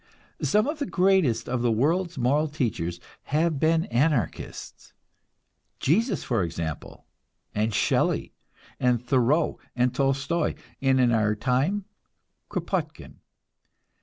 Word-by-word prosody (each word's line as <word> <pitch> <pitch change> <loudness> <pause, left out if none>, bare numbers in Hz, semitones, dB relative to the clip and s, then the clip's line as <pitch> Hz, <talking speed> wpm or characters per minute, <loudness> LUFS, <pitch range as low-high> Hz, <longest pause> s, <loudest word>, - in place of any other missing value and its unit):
Some 210 +1 +3
of 300 +2 -3
the 285 - -2
greatest 180 - +2
of 125 -1 -1
the 120 -1 +2
world's 165 +9 +1
moral 140 +5 +2
teachers 105 - -2 0.3
have 155 0 +1
been 160 +2 +2
Anarchists: 125 - -2 0.9
Jesus, 220 - +1
for 120 -5 0
example, 80 -2 -5 0.5
and 110 +2 0
Shelley - - +1 0.5
and 125 -1 +2
Thoreau 130 +4 +2 0.2
and 125 0 +2
Tolstoi, 140 +5 0 0.3
and 135 -1 +3
in 125 -2 +4
our 105 -2 +2
time 135 - 0 0.6
Kropotkin. - - -4
135 Hz, 110 wpm, -26 LUFS, 120-165 Hz, 0.9 s, in